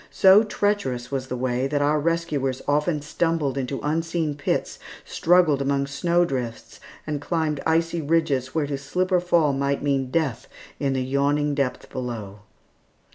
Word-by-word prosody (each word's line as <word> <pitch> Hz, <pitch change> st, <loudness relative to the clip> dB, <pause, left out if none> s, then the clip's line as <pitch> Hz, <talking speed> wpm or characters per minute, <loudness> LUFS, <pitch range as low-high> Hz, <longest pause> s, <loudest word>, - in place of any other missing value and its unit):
So 190 Hz, +2 st, +6 dB
treacherous 205 Hz, -, -1 dB
was 135 Hz, -1 st, -3 dB
the 125 Hz, -, -4 dB
way 125 Hz, +1 st, 0 dB
that 145 Hz, +1 st, 0 dB
our 150 Hz, +1 st, +2 dB
rescuers 150 Hz, -5 st, -1 dB
often 150 Hz, +1 st, +1 dB
stumbled 155 Hz, -2 st, 0 dB
into 135 Hz, 0 st, -3 dB
unseen 165 Hz, 0 st, -1 dB
pits, 145 Hz, -, -2 dB, 0.3 s
struggled 165 Hz, -5 st, +3 dB
among 140 Hz, 0 st, 0 dB
snow 170 Hz, +5 st, +1 dB
drifts, 125 Hz, -6 st, -5 dB, 0.3 s
and 150 Hz, -2 st, -3 dB
climbed 155 Hz, -2 st, -1 dB
icy 165 Hz, +1 st, +1 dB
ridges 140 Hz, -4 st, 0 dB
where 155 Hz, -2 st, +1 dB
to 140 Hz, -1 st, -4 dB
slip 180 Hz, +7 st, -2 dB
or 180 Hz, -, +4 dB
fall 170 Hz, -5 st, +2 dB
might 140 Hz, +1 st, -1 dB
mean 135 Hz, -2 st, 0 dB
death 135 Hz, -6 st, -1 dB, 0.3 s
in 140 Hz, -2 st, 0 dB
the 130 Hz, -1 st, -1 dB
yawning 145 Hz, +2 st, +1 dB
depth 140 Hz, -3 st, -2 dB
below. 115 Hz, -6 st, -5 dB
145 Hz, 155 wpm, -24 LUFS, 135-165 Hz, 0.3 s, So